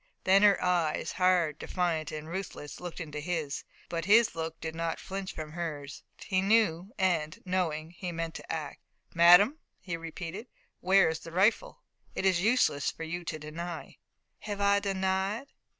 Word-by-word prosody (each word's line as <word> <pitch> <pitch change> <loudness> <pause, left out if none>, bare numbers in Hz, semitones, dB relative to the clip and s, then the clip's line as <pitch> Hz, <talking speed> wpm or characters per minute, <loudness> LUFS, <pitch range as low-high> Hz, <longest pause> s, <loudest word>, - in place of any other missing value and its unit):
Then 195 +1 +5
her 205 -1 +6
eyes, 175 -4 +1
hard, 180 -4 +2
defiant 165 -4 -1
and 155 0 -6
ruthless, 170 -4 -6
looked 175 -1 -7
into 150 -3 -5
his. 155 -3 -3 0.2
But 165 -1 -3
his 220 +3 +5
look 165 0 -5
did 160 0 -5
not 165 0 -2
flinch 195 0 -5
from 155 -1 -7
hers. 150 -4 -5 0.2
He 185 -1 0
knew, 195 -3 +2
and, 170 -6 +1
knowing, 165 -4 -1
he 180 0 -6
meant 165 -1 -4
to - - -7
act. - - -5 0.3
"Madame," 180 - +7 0.2
he 175 -3 -4
repeated, 165 +6 -7 0.3
"where 195 +1 +5
is 160 0 -1
the 165 - -10
rifle? 195 +6 +1 0.3
It - - -2
is 185 -2 +3
useless 220 - +2
for - - -7
you 175 +2 -4
to 155 - -3
deny." 160 +3 -7 0.4
"Have 205 -1 -5
I 200 0 +4
denied?" 195 +5 -1
175 Hz, 165 wpm, -30 LUFS, 160-190 Hz, 0.4 s, Madame